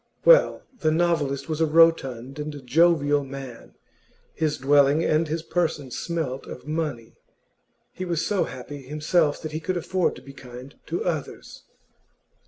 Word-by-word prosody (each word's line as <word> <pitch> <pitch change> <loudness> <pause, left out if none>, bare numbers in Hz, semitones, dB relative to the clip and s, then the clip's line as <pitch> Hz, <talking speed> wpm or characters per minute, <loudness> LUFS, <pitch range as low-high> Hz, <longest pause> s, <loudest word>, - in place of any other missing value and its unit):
Well, - - +6 0.2
the 155 - +2
novelist 155 -5 0
was 160 -1 -3
a 160 - +4
rotund 145 -5 +2
and 145 -3 -6
jovial 145 0 +3
man; 135 -3 -9 0.6
his 155 -2 -1
dwelling 140 +3 +4
and 155 +1 +2
his 160 +1 -3
person 160 -6 -2
smelt 155 -3 -4
of - - -9
money; 150 -8 -3 0.8
he 185 - -6
was 170 -3 -1
so 205 -3 +1
happy 140 +3 -8
himself 150 +3 0
that 155 - -5
he 155 - -3
could 180 +3 -2
afford 180 +1 0
to - - -13
be 140 - -12
kind 125 0 -11
to 170 - -3
others. 160 -6 -5
150 Hz, 150 wpm, -24 LUFS, 135-165 Hz, 0.8 s, Well